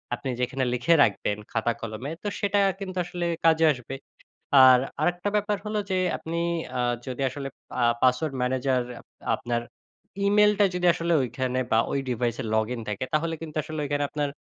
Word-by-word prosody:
আপনি 130 Hz, -, -6 dB
যেইখানে 130 Hz, +1 st, -1 dB
লিখে 125 Hz, +7 st, +3 dB
রাখবেন 105 Hz, 0 st, 0 dB
খাতা-কলমে, 115 Hz, +3 st, -3 dB
তো -, -, -3 dB
সেটা 200 Hz, 0 st, +1 dB, 0.2 s
কিন্তু 190 Hz, -2 st, -6 dB
আসলে 175 Hz, 0 st, -4 dB, 0.2 s
কাজে 165 Hz, 0 st, +5 dB
আসবে। 125 Hz, 0 st, -8 dB, 0.7 s
আর 130 Hz, -1 st, +8 dB, 0.2 s
আরেকটা 175 Hz, +3 st, 0 dB
ব্যাপার 210 Hz, 0 st, 0 dB
হল 210 Hz, 0 st, -2 dB
যে 190 Hz, -, +1 dB, 0.2 s
আপনি 165 Hz, +1 st, -5 dB, 0.4 s
আ -, -, +1 dB, 0.3 s
যদি 130 Hz, +1 st, -4 dB
আসলে 135 Hz, +1 st, -5 dB, 0.3 s
আ -, -, +5 dB, 0.2 s
পাসওয়ার্ড 130 Hz, +3 st, +2 dB
ম্যানেজার 130 Hz, 0 st, +1 dB, 0.2 s
আপ -, -, -22 dB, 0.3 s
আপনার 120 Hz, -1 st, -2 dB, 0.6 s
ইমেইলটা 210 Hz, 0 st, +4 dB
যদি 180 Hz, 0 st, 0 dB
আসলে 170 Hz, 0 st, -1 dB
ঐখানে 130 Hz, +1 st, -2 dB
বা 110 Hz, -, +5 dB
ঐ -, -, -1 dB, 0.2 s
ডিভাইসে 120 Hz, +1 st, -1 dB
লগইন 115 Hz, +2 st, -1 dB
থাকে, 105 Hz, +4 st, -2 dB
তাহলে 165 Hz, +2 st, +1 dB
কিন্তু 155 Hz, -1 st, -8 dB
আসলে 155 Hz, 0 st, -5 dB
ওইখানে 145 Hz, 0 st, -1 dB
আপনার 145 Hz, -1 st, -1 dB
135 Hz, 160 wpm, -26 LUFS, 125-170 Hz, 0.7 s, আর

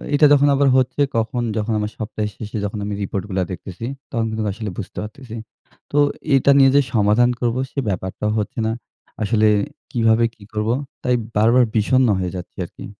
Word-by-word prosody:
এটা 150 Hz, -, +6 dB
যখন 145 Hz, 0 st, +5 dB
আবার 140 Hz, 0 st, +3 dB
হচ্ছে 130 Hz, +2 st, +1 dB, 0.2 s
কখন 115 Hz, +2 st, -1 dB, 0.2 s
যখন 110 Hz, +1 st, -1 dB
আমার 105 Hz, 0 st, -2 dB
সপ্তাহের 105 Hz, -1 st, -3 dB
শেষে 110 Hz, 0 st, -6 dB
যখন 105 Hz, +1 st, -4 dB
আমি 105 Hz, -, -3 dB
report 100 Hz, -1 st, -3 dB
গুলা 95 Hz, -1 st, 0 dB
দেখতেছি, 95 Hz, +3 st, -7 dB, 0.3 s
তখন 115 Hz, -3 st, 0 dB
কিন্তু 110 Hz, 0 st, -3 dB
আসলে 110 Hz, +1 st, -5 dB
বুঝতে 100 Hz, -, -7 dB
পারতেছি। 115 Hz, +2 st, -9 dB, 0.6 s
তো 145 Hz, -, -1 dB, 0.4 s
এটা 135 Hz, +1 st, +4 dB
নিয়ে 135 Hz, -1 st, +7 dB
যে 145 Hz, -, +7 dB
সমাধান 110 Hz, +3 st, +4 dB
করব 120 Hz, -1 st, 0 dB, 0.2 s
সে -, -, -3 dB
ব্যাপারটাও 95 Hz, +3 st, -2 dB
হচ্ছে 105 Hz, -, -4 dB
না। -, -, 0 dB, 0.5 s
আসলে 110 Hz, 0 st, +3 dB, 0.4 s
কিভাবে 115 Hz, -2 st, +3 dB
কি 105 Hz, -, -17 dB
করব, 105 Hz, +1 st, -1 dB, 0.3 s
তাই 125 Hz, -, +2 dB, 0.2 s
বারবার 115 Hz, +4 st, +5 dB
বিষন্ন 125 Hz, +4 st, +3 dB
হয়ে 90 Hz, -1 st, -2 dB
যাচ্ছি 90 Hz, -, -8 dB
আরকি। -, -, -11 dB
110 Hz, 180 wpm, -21 LUFS, 105-125 Hz, 0.6 s, নিয়ে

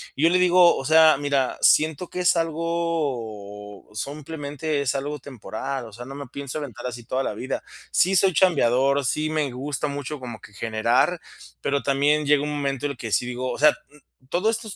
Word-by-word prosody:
y 145 Hz, -, -2 dB
yo 165 Hz, -, +6 dB
le 180 Hz, -, +3 dB
digo: 180 Hz, -1 st, +6 dB
"O -, -, -4 dB
sea, 160 Hz, +1 st, +6 dB
mira, 140 Hz, -2 st, 0 dB
siento 160 Hz, +3 st, +3 dB
que -, -, -5 dB
es 180 Hz, 0 st, +4 dB
algo 145 Hz, -, -3 dB
simplemente 145 Hz, +4 st, -4 dB
es 140 Hz, -, 0 dB
algo 145 Hz, +2 st, -3 dB
temporal, 130 Hz, 0 st, -6 dB
o 110 Hz, -, -12 dB
sea, 120 Hz, +3 st, -9 dB
no 135 Hz, -, -9 dB
me 140 Hz, -1 st, -7 dB
pienso 140 Hz, +2 st, -6 dB
aventar 125 Hz, -5 st, -7 dB
así 120 Hz, -2 st, -6 dB
toda 130 Hz, +3 st, -1 dB
la -, -, -2 dB
vida, 130 Hz, +2 st, -4 dB, 0.3 s
sí 190 Hz, +2 st, +3 dB
soy 190 Hz, 0 st, +4 dB
chambeador, 140 Hz, -5 st, +3 dB
sí 155 Hz, +4 st, 0 dB
me 155 Hz, -3 st, 0 dB
gusta 140 Hz, +3 st, -3 dB
mucho 145 Hz, +1 st, -5 dB
como 120 Hz, -4 st, -7 dB
que -, -, -15 dB
generar, 115 Hz, -, +1 dB, 0.4 s
pero 140 Hz, 0 st, 0 dB
también 145 Hz, +2 st, +2 dB
llega 145 Hz, 0 st, +3 dB
un 150 Hz, -, -2 dB
momento 140 Hz, -2 st, -2 dB
en 145 Hz, -, 0 dB
el 140 Hz, -, -9 dB
que 115 Hz, -1 st, -6 dB
sí -, -, +2 dB
digo, 125 Hz, +1 st, -3 dB
o -, -, -5 dB
sea, 150 Hz, +1 st, +6 dB, 0.6 s
todos 195 Hz, +8 st, +1 dB
estos 220 Hz, -3 st, -8 dB
140 Hz, 200 wpm, -24 LUFS, 125-155 Hz, 0.6 s, yo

